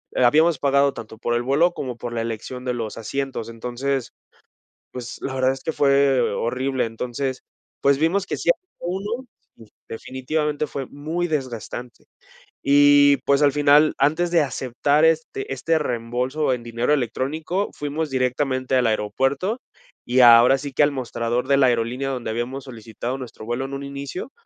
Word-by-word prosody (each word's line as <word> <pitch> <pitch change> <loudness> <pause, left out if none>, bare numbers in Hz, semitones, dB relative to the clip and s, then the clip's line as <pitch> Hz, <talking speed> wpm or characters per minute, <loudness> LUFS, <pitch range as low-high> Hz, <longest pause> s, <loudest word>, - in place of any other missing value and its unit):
habíamos 150 +5 +4
pagado 140 0 +3
tanto 110 0 -9
por 120 +1 -2
el 120 - +1
vuelo, 145 +8 +3
como 125 -3 -5
por 120 0 -6
la 115 - -1
elección 115 +3 -5
de 125 -1 -1
los 115 -3 -5
asientos. 135 0 -4
Entonces, 125 +3 -3 0.8
pues, 120 -1 -7
la 135 - -4
verdad 130 0 +2
es 135 - -7
que 160 - -1
fue 140 -2 +3
horrible. 130 +2 -1
Entonces, 125 +3 -4 0.4
pues, 140 0 +4
vimos 170 +6 +1
que - - -3
sí - - -2
había 370 0 -52
uno 205 +8 -4 0.6
definitivamente 150 +5 -3
fue 135 -1 -5
muy 160 +5 -3
desgastante. 125 -4 -5 0.6
Y, 145 0 +6
pues, 140 +1 +3
al 145 - +5
final, 145 +1 +5
antes 160 +5 +2
de 170 -2 +4
aceptar 140 +3 +1
este 160 -4 0
este 160 +5 0
reembolso 125 +3 -1
en 125 -2 -4
dinero 120 +4 -1
electrónico, 150 - -1
fuimos 150 +2 -3
directamente 130 0 0
al 125 -2 +3
aeropuerto. 135 - -1 0.4
Y 125 +2 +1
ahora 120 +2 +8
sí 140 0 -7
que - - +1
al 145 - +3
mostrador 120 -1 -2
de 140 - +4
la 130 -2 +5
aerolínea 120 +3 0
donde 125 -4 -3
habíamos 125 +4 -4
solicitado 120 +1 -6
nuestro 125 -4 -9
vuelo 120 +3 -2
en 135 - -7
un 140 - -5
inicio, 140 - -6
135 Hz, 160 wpm, -22 LUFS, 120-145 Hz, 0.8 s, ahora